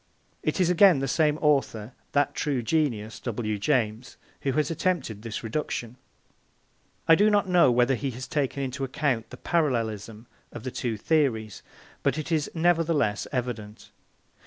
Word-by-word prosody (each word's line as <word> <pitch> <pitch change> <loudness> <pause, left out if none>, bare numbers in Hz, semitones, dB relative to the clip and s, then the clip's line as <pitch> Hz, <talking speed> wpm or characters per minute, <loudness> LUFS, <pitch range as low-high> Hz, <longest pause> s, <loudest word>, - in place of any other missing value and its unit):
It - - -1
is 180 -1 +3
again 180 -2 +6
the 135 0 -1
same 150 +2 +2
author, 130 -6 +1 0.2
that 145 0 +2
true 140 -5 -1
genius, 115 -7 -1
W. 110 -3 -3
James, 115 -1 -1 0.2
who 135 - 0
has 150 +2 0
attempted 155 - -1
this 115 0 -5
reduction. 120 -1 -3 1.1
I 165 - +8
do 205 +6 +5
not 205 -2 +2
know 180 -7 +5
whether 120 +2 +3
he 135 +2 -2
has 130 - -6
taken 140 -2 -1
into 135 +1 -4
account 130 -3 -1
the - - -10
parallelism 115 - -1 0.3
of 115 - -9
the 130 - -4
two 115 -3 -3
theories, 115 -6 0 0.4
but - - +1
it 155 +2 -4
is 155 -3 +1
nevertheless 160 -10 +1
evident. 115 -5 -5
130 Hz, 155 wpm, -26 LUFS, 115-155 Hz, 1.1 s, I